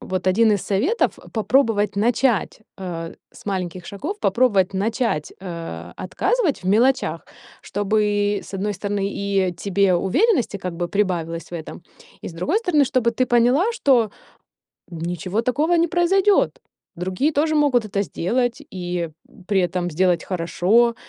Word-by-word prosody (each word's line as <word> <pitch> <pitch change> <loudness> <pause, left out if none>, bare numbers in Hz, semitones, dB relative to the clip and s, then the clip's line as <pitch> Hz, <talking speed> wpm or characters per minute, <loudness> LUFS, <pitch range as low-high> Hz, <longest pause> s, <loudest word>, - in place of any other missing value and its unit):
вот 185 0 -4
один 215 +4 +4
из 205 - +1
советов 275 - 0
попробовать 220 -3 +2
начать, 230 -2 +1 0.2
э, 170 -3 -5 0.2
с - - -16
маленьких 185 -3 -3
шагов, 320 - -5
попробовать 195 -3 +2
начать, 210 - -1
э, 165 - -7
отказывать 350 - 0
в - - -15
мелочах, 225 -6 +2 0.4
чтобы, 205 0 0
с - - -12
одной 205 +2 -2
стороны, 200 0 -2
и 195 -2 0
тебе 200 -1 +2
уверенности 245 - +1
как 180 -2 -5
бы 175 0 -2
прибавилось 170 -5 -2
в - - -19
этом, 165 +1 -7 0.4
и, - - -5
с - - -9
другой 240 - 0
стороны, 335 -10 +3
чтобы 255 -3 +1
ты 255 - +1
поняла, 250 - +3
что 260 - +3 0.8
ничего 175 +4 -3
такого 295 +8 +1
не 335 0 +3
произойдёт, 380 +4 +2 0.4
другие 185 - 0
тоже 310 +2 +1
могут 285 -6 +3
это 200 -1 -1
сделать, 235 - -1
и 175 -2 -3 0.4
при 200 -2 +2
этом 175 0 -1
сделать 175 +1 +2
хорошо, 190 +7 +2
205 Hz, 140 wpm, -22 LUFS, 180-255 Hz, 0.8 s, один